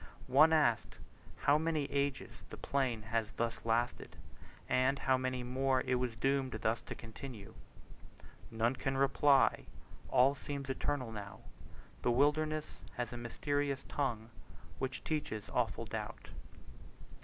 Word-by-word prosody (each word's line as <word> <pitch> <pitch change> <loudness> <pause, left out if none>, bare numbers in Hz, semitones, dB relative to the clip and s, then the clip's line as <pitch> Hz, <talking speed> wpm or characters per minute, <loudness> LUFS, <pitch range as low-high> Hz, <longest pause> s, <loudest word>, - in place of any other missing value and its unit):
One 155 +4 +8
asked 145 -8 +2 0.5
how 145 +1 +4
many 160 -2 0
ages 140 -1 -1 0.2
the - - -8
plain 130 -6 -1
had 110 0 -1
thus 115 0 -2
lasted, 115 +2 0 0.5
and 130 +2 +2
how 130 -1 +2
many 130 -1 -2
more 130 +1 +1
it 130 - -1
was 125 -2 0
doomed 135 +2 0
thus 110 +1 0
to - - -7
continue. 115 -2 -9 1.0
"None 115 +3 +1
can 135 0 -1
reply 140 0 +4 0.4
all 130 +2 +5
seems 140 -1 -5
eternal 130 -3 -2
now. 100 -2 -8 0.6
The 120 - +1
wilderness 150 +4 +1 0.2
has 120 -1 -3
a - - -5
mysterious 140 +3 -2
tongue, 115 -5 -2 0.5
Which 130 -1 -3
teaches 145 -9 -2
awful - - 0
doubt." - - -6
130 Hz, 130 wpm, -34 LUFS, 120-140 Hz, 1.0 s, One